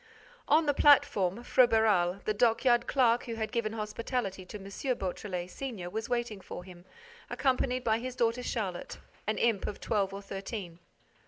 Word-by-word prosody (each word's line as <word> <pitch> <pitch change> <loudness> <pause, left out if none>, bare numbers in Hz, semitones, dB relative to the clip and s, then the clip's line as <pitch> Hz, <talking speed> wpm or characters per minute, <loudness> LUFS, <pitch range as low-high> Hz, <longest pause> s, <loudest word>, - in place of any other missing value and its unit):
On 315 +2 +4
the 290 - +2
platform, 235 -8 +4
Froberval, 220 -8 +3
the 215 - +1
dockyard 240 +2 +3
clerk 245 -3 +3
who 230 - -4
had 220 -1 -3
given 230 -3 -1
hospitality 215 -2 -3
to 210 - -7
M. 195 - -12 0.3
Beautrelet, 180 -1 -4
senior, 220 -10 -6
was 220 +3 -4
waiting 240 -5 -2
for 180 - -8
him, 180 -1 -13 0.4
accompanied 255 -2 0
by 225 -1 +2
his 255 +1 -5
daughter 235 0 +1
Charlotte, 195 -8 -4 0.3
an 215 - 0
imp 230 -4 +1
of 205 - -5
twelve 200 -3 0
or 200 +1 -7
thirteen. 195 -3 -6
220 Hz, 160 wpm, -30 LUFS, 195-245 Hz, 0.4 s, On